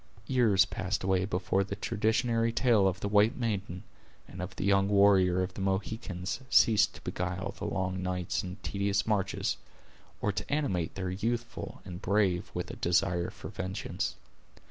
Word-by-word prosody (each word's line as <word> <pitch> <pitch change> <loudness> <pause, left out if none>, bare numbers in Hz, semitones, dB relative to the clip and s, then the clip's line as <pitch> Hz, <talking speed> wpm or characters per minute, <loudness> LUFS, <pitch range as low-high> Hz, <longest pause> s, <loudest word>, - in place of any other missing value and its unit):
Years 110 -7 +4
passed 95 +1 -3
away 95 0 +2
before 95 0 0
the 100 +1 -5
traditionary 115 +3 +1
tale 115 -5 +4
of 95 +1 -2
the - - -1
white 105 +2 +4
maiden, 100 -7 -3 0.4
and 90 - -8
of 90 - -6
the - - -3
young 100 0 +4
warrior 95 -3 +4
of 90 0 -5
the 95 - -6
Mohicans 95 0 -2
ceased 105 -3 +5
to - - -12
beguile 90 +2 -3
the 105 - -4
long 95 -1 -2
nights 90 +1 -1
and 90 -2 -7
tedious 100 0 0
marches, 100 -3 0 0.6
or 105 - 0
to 95 - -5
animate 95 - 0
their 95 -2 -3
youthful 115 +5 -3
and 90 0 -7
brave 95 -3 +1
with - - -3
a - - -7
desire 90 -1 +1
for - - -9
vengeance. 95 - -3
95 Hz, 165 wpm, -30 LUFS, 90-105 Hz, 0.6 s, ceased